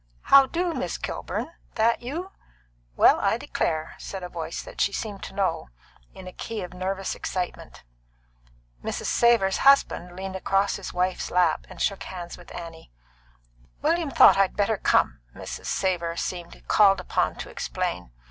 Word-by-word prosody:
"How 275 Hz, -1 st, +9 dB
do, 345 Hz, +2 st, -1 dB
Miss -, -, -3 dB
Kilburn? -, -, -4 dB, 0.2 s
That 230 Hz, +1 st, +2 dB
you? 330 Hz, +10 st, -5 dB, 0.6 s
Well, -, -, +6 dB
I -, -, +2 dB
declare!" 155 Hz, 0 st, -2 dB
said 195 Hz, -2 st, -6 dB
a 180 Hz, -, -5 dB
voice 170 Hz, -1 st, -5 dB
that -, -, -7 dB
she 200 Hz, -, +3 dB
seemed 205 Hz, -1 st, -5 dB
to -, -, -10 dB
know, 185 Hz, -, -1 dB, 0.5 s
in 190 Hz, -, -10 dB
a 185 Hz, -, -8 dB
key 225 Hz, -4 st, -5 dB
of 180 Hz, -, -8 dB
nervous 190 Hz, +1 st, -3 dB
excitement. 180 Hz, -1 st, -5 dB, 1.0 s
Mrs. -, -, -3 dB
Savor's 230 Hz, -5 st, +3 dB
husband 270 Hz, -10 st, +3 dB
leaned 190 Hz, 0 st, -5 dB
across 195 Hz, +1 st, +1 dB
his 200 Hz, -, -7 dB
wife's 180 Hz, +1 st, -1 dB
lap 175 Hz, -3 st, +2 dB
and -, -, -12 dB
shook 200 Hz, -, 0 dB
hands 175 Hz, -2 st, -7 dB
with 175 Hz, -, -15 dB
Annie. 165 Hz, -, -9 dB, 0.9 s
"William 325 Hz, 0 st, +1 dB
thought 270 Hz, -, +7 dB
I 195 Hz, 0 st, +5 dB
better 205 Hz, +2 st, 0 dB
come," -, -, +2 dB, 0.2 s
Mrs. -, -, -7 dB
Savor 170 Hz, -3 st, -1 dB
seemed 175 Hz, -1 st, -5 dB
called 195 Hz, -2 st, +5 dB
upon 185 Hz, -, 0 dB
to -, -, -7 dB
explain. 90 Hz, -6 st, -3 dB
190 Hz, 155 wpm, -25 LUFS, 180-220 Hz, 1.0 s, How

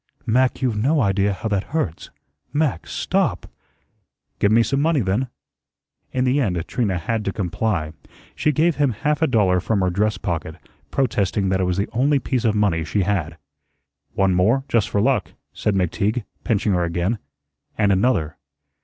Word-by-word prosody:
"Mac, 130 Hz, +3 st, +2 dB
you've 110 Hz, -5 st, 0 dB
no 150 Hz, +6 st, +2 dB
idea 100 Hz, -3 st, +2 dB
how 100 Hz, +4 st, -4 dB
that 100 Hz, -2 st, 0 dB
hurts. 85 Hz, -, -2 dB, 0.4 s
Mac, 145 Hz, -, 0 dB
STOP!" -, -, -1 dB, 0.9 s
"Give 100 Hz, -, +3 dB
me 115 Hz, +1 st, +5 dB
some 135 Hz, +4 st, 0 dB
money, 155 Hz, -2 st, +2 dB
then." 105 Hz, +6 st, 0 dB, 0.8 s
In 125 Hz, -, 0 dB
the 130 Hz, +3 st, +2 dB
end 95 Hz, -8 st, 0 dB
Trina 105 Hz, -7 st, 0 dB
had 110 Hz, +6 st, -2 dB
to 100 Hz, -, -1 dB
comply. 95 Hz, -4 st, -2 dB, 0.4 s
She 155 Hz, -, +1 dB
gave 155 Hz, +1 st, +2 dB
him 140 Hz, -4 st, +2 dB
half 150 Hz, +8 st, -1 dB
a 160 Hz, -, +4 dB
dollar 100 Hz, -8 st, +3 dB
from 100 Hz, +3 st, 0 dB
her 90 Hz, -1 st, +1 dB
dress 105 Hz, +4 st, 0 dB
pocket, 80 Hz, -3 st, -3 dB, 0.3 s
protesting 100 Hz, -6 st, 0 dB
that 95 Hz, 0 st, +1 dB
it -, -, +2 dB
was 90 Hz, 0 st, -1 dB
the 100 Hz, -, 0 dB
only 140 Hz, +5 st, +2 dB
piece 130 Hz, -3 st, -1 dB
of 110 Hz, -2 st, +2 dB
money 100 Hz, -6 st, +1 dB
she 100 Hz, +5 st, 0 dB
had. 85 Hz, -4 st, -1 dB, 0.8 s
"One 95 Hz, -1 st, +3 dB
more, 110 Hz, +10 st, +3 dB
just 115 Hz, -5 st, +1 dB
for 100 Hz, -, +1 dB
luck," 125 Hz, -5 st, +1 dB, 0.2 s
said 105 Hz, -, -1 dB
McTeague, 100 Hz, +5 st, 0 dB, 0.2 s
pinching 105 Hz, -2 st, +1 dB
her 90 Hz, -1 st, +1 dB
again; 90 Hz, +6 st, -1 dB, 0.6 s
"and 105 Hz, -2 st, +3 dB
another." 95 Hz, -6 st, +1 dB
105 Hz, 170 wpm, -22 LUFS, 95-125 Hz, 0.9 s, me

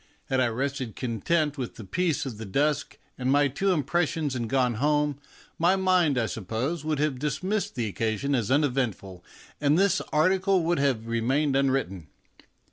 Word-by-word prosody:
Had 130 Hz, -, +1 dB
I 130 Hz, -, +3 dB
rested 130 Hz, 0 st, -3 dB
content 145 Hz, -, -1 dB
with 125 Hz, -, -4 dB
the 110 Hz, -, -9 dB
peace 155 Hz, -, -1 dB
of 120 Hz, -6 st, -6 dB
the 110 Hz, -, -6 dB
dusk 145 Hz, +8 st, 0 dB, 0.2 s
and 130 Hz, +1 st, 0 dB
my 145 Hz, +1 st, +4 dB
two 190 Hz, +9 st, 0 dB
impressions 160 Hz, -1 st, 0 dB
and 120 Hz, -3 st, -3 dB
gone 130 Hz, -2 st, +2 dB
home, 150 Hz, -1 st, +1 dB, 0.4 s
my 175 Hz, +3 st, +4 dB
mind, 185 Hz, -7 st, +2 dB
I 115 Hz, -, +2 dB
suppose, 115 Hz, -, -3 dB
would 155 Hz, -1 st, -1 dB
have 145 Hz, -3 st, 0 dB
dis 150 Hz, +4 st, -2 dB
missed 205 Hz, +2 st, -1 dB
the 120 Hz, -2 st, -1 dB
occasion 110 Hz, +6 st, -1 dB
as 120 Hz, -6 st, 0 dB
uneventful, 125 Hz, -, 0 dB, 0.4 s
and 145 Hz, +1 st, +3 dB
this 195 Hz, -1 st, +3 dB
article 185 Hz, +3 st, +3 dB
would 170 Hz, 0 st, +1 dB
have 130 Hz, -6 st, +1 dB
remained 130 Hz, +5 st, 0 dB
unwritten. 130 Hz, -, 0 dB
140 Hz, 170 wpm, -26 LUFS, 120-155 Hz, 0.4 s, my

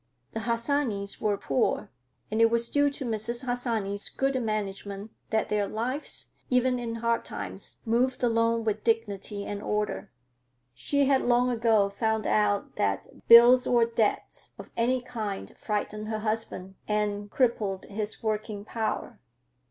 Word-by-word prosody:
The 225 Hz, -, -3 dB
Harsanyis 230 Hz, -2 st, 0 dB
were 205 Hz, -1 st, +1 dB
poor, 135 Hz, -7 st, 0 dB, 0.4 s
and 220 Hz, +1 st, +1 dB
it 230 Hz, -, +7 dB
was 235 Hz, 0 st, +1 dB
due 285 Hz, 0 st, +4 dB
to 275 Hz, -1 st, -6 dB
Mrs. 235 Hz, +2 st, -2 dB
Harsanyi's 230 Hz, -5 st, -1 dB
good 270 Hz, -1 st, 0 dB
management 205 Hz, -1 st, -3 dB, 0.2 s
that 220 Hz, -, 0 dB
their 205 Hz, -1 st, +1 dB
lives, 250 Hz, +8 st, -3 dB, 0.2 s
even 250 Hz, 0 st, +2 dB
in 230 Hz, -1 st, -4 dB
hard 230 Hz, 0 st, 0 dB
times, 95 Hz, -2 st, -6 dB
moved 250 Hz, +3 st, +1 dB
along 230 Hz, -1 st, +2 dB
with 215 Hz, -1 st, -1 dB
dignity 205 Hz, -3 st, -1 dB
and 205 Hz, 0 st, -4 dB
order. 210 Hz, 0 st, -2 dB, 0.6 s
She 280 Hz, -, +1 dB
had 270 Hz, -1 st, +3 dB
long 245 Hz, +1 st, +3 dB
ago 225 Hz, -4 st, +3 dB
found 220 Hz, +2 st, -1 dB
out 205 Hz, -1 st, +1 dB
that 100 Hz, -1 st, -2 dB
bills 245 Hz, +2 st, +9 dB
or 240 Hz, -2 st, +4 dB
debts 230 Hz, -2 st, -1 dB
of -, -, -11 dB
any 250 Hz, +2 st, +1 dB
kind 220 Hz, -6 st, -5 dB
frightened 210 Hz, 0 st, -3 dB
her 220 Hz, 0 st, -2 dB
husband 215 Hz, -3 st, -3 dB
and 210 Hz, -1 st, -1 dB
crippled 210 Hz, -6 st, 0 dB
his 210 Hz, +2 st, -5 dB
working 215 Hz, -1 st, -2 dB
power. 220 Hz, 0 st, -3 dB
225 Hz, 145 wpm, -28 LUFS, 205-240 Hz, 0.6 s, bills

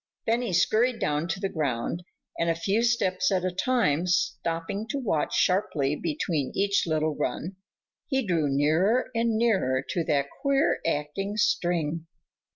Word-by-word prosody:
Then 230 Hz, +2 st, +1 dB
he 240 Hz, -5 st, -2 dB
scurried 225 Hz, +7 st, +2 dB
down 150 Hz, -2 st, -1 dB
to 170 Hz, +3 st, -3 dB
the 195 Hz, -, -1 dB
ground 150 Hz, -1 st, -2 dB, 0.4 s
and, 170 Hz, -, +1 dB
a 165 Hz, -, +2 dB
few 195 Hz, +7 st, 0 dB
steps 190 Hz, -6 st, +1 dB
at 185 Hz, -1 st, +1 dB
a 185 Hz, -, 0 dB
time, 180 Hz, -, +1 dB
stopping 170 Hz, +3 st, -1 dB
to 280 Hz, -, -3 dB
watch 205 Hz, -, -1 dB
sharply 160 Hz, -7 st, +1 dB
between 175 Hz, -, -2 dB
each 200 Hz, -2 st, +1 dB
little 155 Hz, -1 st, 0 dB
run, 175 Hz, +5 st, -3 dB, 0.5 s
he 265 Hz, -3 st, 0 dB
drew 165 Hz, -6 st, +1 dB
nearer 160 Hz, -, +2 dB
and 230 Hz, -1 st, +1 dB
nearer 185 Hz, -, +1 dB
to 175 Hz, -4 st, 0 dB
that 140 Hz, -3 st, +1 dB, 0.2 s
queer 275 Hz, +1 st, +2 dB
acting 165 Hz, +7 st, -2 dB
string. 165 Hz, -5 st, 0 dB
180 Hz, 155 wpm, -27 LUFS, 155-220 Hz, 0.5 s, scurried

